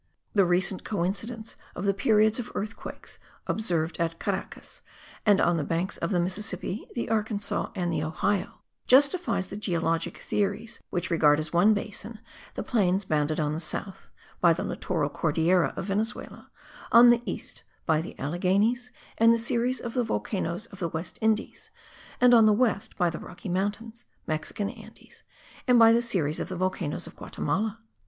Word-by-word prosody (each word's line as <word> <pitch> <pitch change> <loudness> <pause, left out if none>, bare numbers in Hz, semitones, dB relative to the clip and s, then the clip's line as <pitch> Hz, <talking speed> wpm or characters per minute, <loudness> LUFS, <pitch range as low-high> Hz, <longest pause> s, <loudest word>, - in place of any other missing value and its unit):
The 200 -3 +4
recent 180 +2 +1
coincidence 215 +4 -3 0.2
of 185 - -4
the 200 - +3
periods 215 +2 +3
of 240 - -5
earthquakes 210 +2 -6 0.3
observed 170 -7 -1
at 165 0 -1
Caracas 195 +1 -5 0.5
and 205 -2 +6
on 175 -1 +3
the 155 - -1
banks 170 +6 -1
of - - -2
the 185 -4 +1
Mississippi, 190 +2 -3
the 235 - -2
Arkansas 215 -2 -1
and 175 -3 -1
the 155 - 0
Ohio, 180 +5 -1 0.3
justifies 285 - +4
the 200 - -8
geologic 165 -5 -1
theories 205 +2 -2
which 180 0 -2
regard 150 -3 +4
as 155 +1 -4
one 200 +6 +5
basin 215 +2 -5 0.4
the - - -3
plains 195 -4 +1
bounded 155 -1 0
on 150 -1 0
the 155 - -3
south, 185 +4 -5 0.3
by 170 -1 +5
the 165 - -3
littoral 165 -6 -1
Cordillera 165 +4 +2
of - - -3
Venezuela; 210 +3 -3 0.4
on 240 +1 +9
the 240 0 +3
east, - - -5 0.2
by 160 -2 +2
the 165 - -9
Alleghenies 200 - +1 0.3
and 230 +1 +7
the 230 - +4
series 235 +2 0
of 235 - -5
the 250 - +1
volcanoes 195 -4 -2
of 195 - -12
the 170 -3 -1
West 160 +2 -6
Indies; 220 +1 -1 0.5
and 250 0 +6
on 225 -2 +7
the 215 - +5
west, 220 -3 0
by 175 -3 +2
the 165 - -6
Rocky 180 +3 -9
Mountains 210 +6 -3 0.2
(Mexican 155 +6 -3
Andes) - - -15 0.5
and 250 -1 +6
by 225 -1 +8
the 235 - +3
series 175 -11 -1
of - - -4
the 185 - -4
volcanoes 180 -3 -2
of - - -11
Guatimala. 215 +4 -2
195 Hz, 170 wpm, -27 LUFS, 170-220 Hz, 0.5 s, on